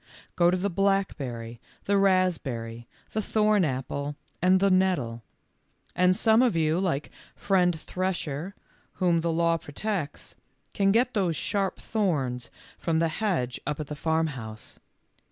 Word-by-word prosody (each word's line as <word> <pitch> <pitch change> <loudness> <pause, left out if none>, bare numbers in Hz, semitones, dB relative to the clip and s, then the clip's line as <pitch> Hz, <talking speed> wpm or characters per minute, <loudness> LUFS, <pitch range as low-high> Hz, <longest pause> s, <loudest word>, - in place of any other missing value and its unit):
Go 175 -1 +4
to 180 - +2
the 200 +2 -1
blackberry, 140 - -1 0.2
the 200 - +1
raspberry, 150 -13 +1 0.2
the 220 - -1
thorn 215 -2 +2
apple, 140 +1 -2 0.3
and 185 +2 +5
the 195 0 +3
nettle; 175 -12 +1 0.7
and 180 0 +4
some 220 +2 +4
of 245 -8 +3
you, 160 +1 +2
like 165 -7 -1 0.2
friend 180 -4 +2
Thresher, 180 -1 -3 0.4
whom 175 -2 +2
the 170 0 0
law 165 0 +2
protects, 165 +1 -4 0.4
can 195 -1 +3
get 245 +4 +2
those 185 -6 +1
sharp 195 +3 -1
thorns 140 - -1 0.3
from 165 -2 0
the 165 0 +2
hedge 160 - -1
up 150 0 -2
at 150 - -3
the 150 - -6
farmhouse. 145 -9 -3
170 Hz, 135 wpm, -27 LUFS, 145-195 Hz, 0.7 s, and